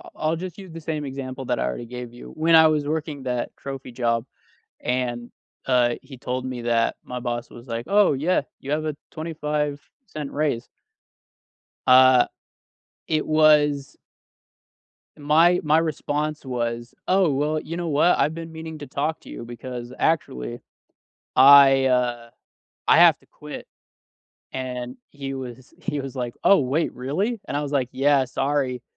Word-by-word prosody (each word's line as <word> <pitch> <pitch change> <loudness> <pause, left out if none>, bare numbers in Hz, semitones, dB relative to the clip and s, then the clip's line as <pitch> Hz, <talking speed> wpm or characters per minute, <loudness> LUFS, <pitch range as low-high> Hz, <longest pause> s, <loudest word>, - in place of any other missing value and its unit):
I'll 155 +1 0
just 175 0 -7
use 190 -3 -10
the 165 0 -8
same 155 -2 -3
example 135 -1 -6
that - - -1
I - - 0
already 65 - -4
gave 125 0 -8
you. 120 - -11
When 165 +1 +4
I 160 0 +8
was 150 -2 +1
working 150 -2 -3
that 125 -2 -3
trophy 135 -2 -7
job 115 -1 0 0.5
and 120 -1 -2 0.3
uh, 125 -2 +3
he 135 - -12
told 125 +1 -4
me 130 -2 -4
that 115 -1 +1
my 125 0 -6
boss 120 -1 -4
was 120 +2 -13
like, 115 0 -4
“Oh, 205 -4 +4
yeah 155 +7 +1 0.2
you 140 - -7
have 155 +1 0
a 155 -2 -2 0.2
25¢ 150 -3 -3 0.5
raise.” 145 -6 -1 1.2
Uh. 130 -1 +7 0.8
It 155 -1 0
was 150 -2 +3 1.2
my 160 +5 +4
my 155 0 +4
response 155 -2 -2
was, 120 -2 -3
“Oh, 185 -3 +3
well, 150 +3 0
you 165 +2 -6
know 175 -1 -3
what? 155 +4 +3
I've 155 - +2
been 165 0 -7
meaning 160 0 -7
to 145 - -8
talk 155 +3 -2
to - - -14
you - - -7
because, 120 +1 -7
actually, 60 - -1 0.8
I, 135 0 +8
uh, 120 -2 0 0.6
I - - +6
have - - +7
to - - -26
quit.” - - -10 0.8
And 125 -1 -5
he 135 -2 -6
was 130 -1 -8
he 145 - -2
was 135 -1 -7
like, 120 -2 -4
“Oh, 200 - +6
wait 140 +5 0
really?” 185 - -2
And - - -5
I - - -1
was 145 -1 -4
like, 135 -4 0
“Yeah 140 0 +3
sorry, 135 -1 -1
140 Hz, 160 wpm, -24 LUFS, 125-155 Hz, 1.2 s, I